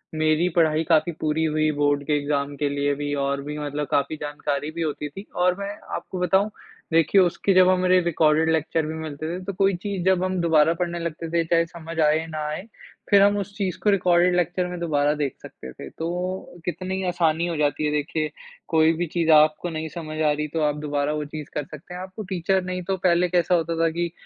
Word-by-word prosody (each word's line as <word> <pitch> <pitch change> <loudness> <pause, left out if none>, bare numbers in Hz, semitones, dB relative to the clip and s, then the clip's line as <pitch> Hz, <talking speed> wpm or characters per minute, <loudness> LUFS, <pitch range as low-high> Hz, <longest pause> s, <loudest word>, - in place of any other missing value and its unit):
मेरी 155 +2 +2
पढ़ाई 160 -2 +3
काफ़ी 160 +1 +3
पूरी 155 +1 0
हुई 155 0 +1
बोर्ड 145 0 +2
के 150 - +1
एग्ज़ाम 145 0 -2
के 145 0 0
लिए 145 0 0
भी 145 0 -3
और 140 0 -1
भी 150 +1 -5
मतलब 145 -1 -3
काफ़ी 140 +2 +1
जानकारी 145 0 -3
भी 170 - -3
होती 150 -2 -3
थी 195 +8 -10
और 180 0 +2
मैं 200 0 -3 0.3
आपको 185 - -6
बताऊँ। 190 +4 +2 0.4
देखिए 165 +4 +5
उसके 185 +2 +1
जब 185 0 +6
हमारे 185 0 +4
रिकॉर्डेड 160 -1 +2
लेक्चर 160 0 0
भी 155 - -4
मिलते 155 -1 -5
थे, 185 - -7
तो 200 +2 -4
कोई 195 +1 +2
चीज़ 190 0 -4
जब 190 -1 +3
हम 185 0 -1
दोबारा 165 -1 +4
पढ़ने 175 0 -3
लगते 165 0 -4
थे, 170 0 +1
चाहे 170 0 +2
समझ 165 -1 -8
आए 155 +1 +3
ना 155 -1 -5
आए, 155 +4 -3 0.5
फिर 200 -1 +6
हम 205 +1 +4
उस 200 0 -5
चीज़ 190 -4 -2
को 210 - +4
रिकॉर्डेड 180 -2 +3
लेक्चर 180 +1 0
में 180 -1 -6
दोबारा 150 -3 +1
देख 145 -3 -2
सकते 65 - -10
थे। 70 - -9
तो 180 - -5
कितनी 185 +2 -3
आसानी 170 -1 +1
हो 170 - -2
जाती 150 0 0
है, 150 - +1
देखिए 150 +1 -1 0.4
कोई 160 0 +4
भी 170 +2 -2
चीज़ 165 -2 +3
आपको 155 +3 +4
नहीं 160 -1 -4
समझ 155 -2 -6
आ 155 -1 +3
रही 150 +1 -2
तो 160 - 0
आप 150 -1 +1
दोबारा 145 0 -1
वो 150 -1 -3
चीज़ 150 0 -8
कर 150 - -2
सकते 155 +5 -11
हैं। 180 - -6
आपको 190 +3 -7
टीचर 190 +1 +1
नहीं 185 0 -4
तो 190 +2 -2
पहले 180 0 +2
कैसा 175 0 +2
होता 165 0 0
था 165 - +3
कि 170 -1 -1
165 Hz, 225 wpm, -24 LUFS, 150-180 Hz, 0.5 s, जब